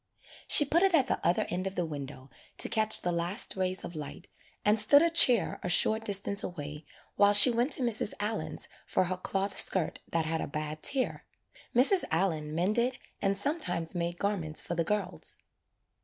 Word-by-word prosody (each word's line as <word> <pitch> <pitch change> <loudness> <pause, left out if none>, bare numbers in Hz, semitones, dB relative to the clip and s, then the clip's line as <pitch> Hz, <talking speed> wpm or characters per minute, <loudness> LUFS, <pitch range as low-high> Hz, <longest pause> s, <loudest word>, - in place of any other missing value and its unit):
She 295 - +7
put 330 +5 +1
it 385 -2 +2
at 275 -5 +2
the - - -4
other 175 - 0
end 185 +2 -4
of 190 - -7
the 175 - -2
window 140 -3 -9 0.3
to - - +2
catch 215 0 +2
the 175 - -3
last 175 +6 0
rays 185 0 -3
of - - -8
light 150 +3 -9 0.4
and 210 +1 +3
stood 285 +8 +5
a 335 - +1
chair 250 -9 +4
a 180 - -5
short 220 +5 +2
distance 200 0 0
away 150 -3 -8 0.3
while 205 0 +4
she 205 +5 +8
went 240 +5 -1
to 260 - +3
Mrs. 225 -3 +1
Allen's 210 +2 -3 0.2
for - - 0
her 185 0 -4
cloth 195 +2 -4
skirt 185 -5 +3
that 165 -1 -1
had 160 0 -2
a - - -5
bad 155 +1 -6
tear. 265 -2 -1 0.5
Mrs. 285 +10 +4
Allen 160 -3 -2
mended 225 +9 -1 0.2
and 195 0 0
sometimes 195 - -1
made 175 -1 -4
garments 175 -7 -3
for - - -4
the 170 -1 -1
girls. 190 0 -3
190 Hz, 185 wpm, -28 LUFS, 170-220 Hz, 0.5 s, she